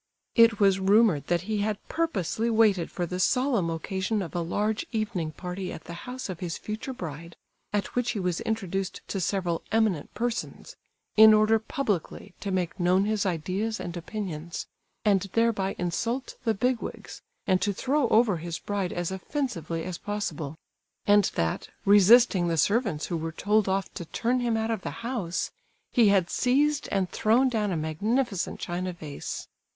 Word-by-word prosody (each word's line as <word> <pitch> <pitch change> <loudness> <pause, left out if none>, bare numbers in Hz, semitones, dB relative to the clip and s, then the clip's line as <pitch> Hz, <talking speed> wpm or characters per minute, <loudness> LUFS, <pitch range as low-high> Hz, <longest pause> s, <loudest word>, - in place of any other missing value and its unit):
It 230 -2 +5
was 195 -2 +4
rumoured 195 -5 +4
that 175 -1 +1
he 210 +3 -2
had 210 0 0
purposely 230 - -1
waited 215 -6 +3
for 175 - -3
the 180 +2 -4
solemn 245 -4 +2
occasion 190 +5 -2
of 165 - -8
a 175 - -1
large 210 - -1
evening 205 -8 -2
party 180 +3 -5
at - - -8
the 170 - -8 0.2
house 255 +1 -5
of 185 -4 -6
his 175 -2 -3
future 220 +5 -5
bride, 170 - -7 0.4
at 205 -2 -2
which 245 -1 0
he 215 - -3
was 180 -2 -1
introduced 195 -3 -2
to 195 - -2
several 180 -2 -1
eminent 220 -8 +1
persons, 240 -1 -3 0.4
in 220 0 +9
order 215 +1 +4
publicly 220 - -3
to 200 - -4
make 185 -1 -1
known 180 +2 +3
his 215 -2 0
ideas 190 +6 -2
and 175 0 -5
opinions, 170 -3 -5 0.4
and 200 -3 +4
thereby 225 -4 +1
insult 230 +9 -2
the 225 -1 +2
"big 250 +3 +1
wigs," - - -7 0.2
and 185 -2 +2
to 205 - +1
throw 265 +6 +1
over 220 -4 +4
his 165 +1 -4
bride 200 -3 -2
as 175 0 -2
offensively 190 - -3
as 180 -1 -5
possible; 205 -8 -4 0.5
and 205 -1 +5
that, 80 0 -1 0.2
resisting 205 -1 +6
the 165 -1 0
servants 200 - +1
who 170 - -2
were 165 0 -3
told 205 +4 +1
off 195 0 -1
to 175 - -6
turn 240 +9 0
him 235 -2 +1
out 220 +1 -1
of 225 - -2
the - - -4 0.2
house, 210 -9 -2 0.4
he 235 -4 +5
had 195 -4 +4
seized 285 +8 +1
and 190 -2 0
thrown 235 +5 +3
down 215 -5 0
a 175 - 0
magnificent 195 - -1
china 180 +1 -3
vase. 155 -4 -6
200 Hz, 170 wpm, -27 LUFS, 175-225 Hz, 0.5 s, in